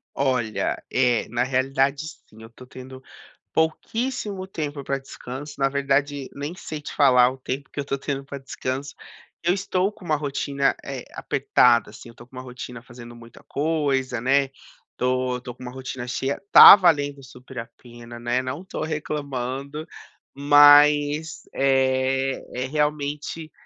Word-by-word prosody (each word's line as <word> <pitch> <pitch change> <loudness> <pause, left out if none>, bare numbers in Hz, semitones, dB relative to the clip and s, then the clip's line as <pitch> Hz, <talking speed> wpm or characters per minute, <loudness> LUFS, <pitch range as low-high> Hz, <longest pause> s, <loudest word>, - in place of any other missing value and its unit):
Olha, 125 -5 -1
eh, 125 -3 +2
na 120 +2 0
realidade, 135 +3 0 0.2
sim. 110 - -17
Eu 110 - -12
tô 120 +2 -15
tendo 130 +1 -11 0.5
pouquíssimo 205 +5 -2
tempo 150 -6 -5
pra 135 0 -2
descanso. 135 +2 -9
Na 135 0 +2
verdade, 140 0 -1
nem 145 +3 -5
sei 155 -5 -7
te - - -8
falar 125 -3 +5
o 130 - -10
tempo 135 +1 -5
que - - -7
eu 140 - -3
tô 140 - -2
tendo 140 0 -4
pra 140 0 -8
descanso. 135 +1 -5 0.5
Eu 175 +1 +3
estou 190 0 -1
com 210 -3 -16
uma 155 -2 +1
rotina, 140 -1 -1
eh, - - -6
apertada, 120 -3 +2
assim. 110 +3 -12
Eu 115 - -16
tô 120 - -15
com 130 - -18
uma 130 - -6
rotina 125 -1 -9
fazendo 120 -1 -12
muita 115 -1 -15
coisa, 140 -5 -1
né. 135 +2 +2 0.5
Tô 125 0 0
tô 125 -1 -8
com 125 - -13
uma 125 - -7
rotina 130 -1 -7
cheia. 135 +3 -2
Tá - - +12
valendo 145 -7 +1
super 130 0 -11
a 115 - -6
pena, 120 -1 -11
né. 120 +2 0
Não 130 +7 -5
tô 190 - -5
reclamando. 145 -1 -4 0.5
Mas, 145 +2 +5
eh 135 0 +1
eh, 125 +1 -3
realmente 150 +2 -2
135 Hz, 155 wpm, -23 LUFS, 125-145 Hz, 0.5 s, Tá